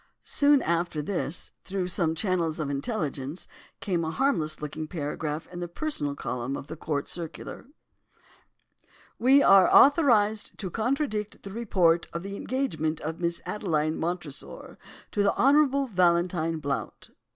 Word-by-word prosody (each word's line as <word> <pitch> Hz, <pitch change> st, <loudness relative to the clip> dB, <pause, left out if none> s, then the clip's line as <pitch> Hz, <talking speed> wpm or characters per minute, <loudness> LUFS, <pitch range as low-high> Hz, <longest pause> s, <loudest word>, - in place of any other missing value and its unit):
"Soon 285 Hz, -1 st, +4 dB
after 170 Hz, -2 st, -1 dB
this, 175 Hz, -2 st, -1 dB
through 190 Hz, -1 st, -3 dB
some 170 Hz, -3 st, 0 dB
channels 170 Hz, -3 st, -1 dB
of 145 Hz, -2 st, -2 dB
intelligence, 145 Hz, -, -3 dB, 0.4 s
came 185 Hz, -7 st, -1 dB
a 160 Hz, -, -2 dB
harmless 165 Hz, -, 0 dB
looking 155 Hz, +1 st, -5 dB
paragraph 150 Hz, -1 st, -4 dB
in 175 Hz, -, -6 dB
the 175 Hz, -, -3 dB
personal 170 Hz, -, -2 dB
column 125 Hz, 0 st, -3 dB
of -, -, -8 dB
the 155 Hz, -, -7 dB
Court 150 Hz, -3 st, -3 dB
Circular:—'We 245 Hz, -, -3 dB
are 195 Hz, -2 st, +6 dB
authorised 235 Hz, -8 st, +4 dB
to 185 Hz, -4 st, -5 dB
contradict 220 Hz, -, -2 dB
the 195 Hz, -, -8 dB
report 185 Hz, -7 st, +2 dB
of 170 Hz, -, -4 dB
the 195 Hz, 0 st, -6 dB
engagement 165 Hz, -, -2 dB
of 160 Hz, +2 st, -5 dB
Miss 170 Hz, -1 st, -1 dB
Adeline 155 Hz, -6 st, -1 dB
Montresor 165 Hz, -4 st, -5 dB, 0.3 s
to 205 Hz, -, 0 dB
the 200 Hz, -, +2 dB
Honourable 280 Hz, 0 st, +4 dB
Valentine 175 Hz, -5 st, +1 dB
Blount. 140 Hz, -3 st, -4 dB
175 Hz, 135 wpm, -27 LUFS, 155-215 Hz, 0.4 s, are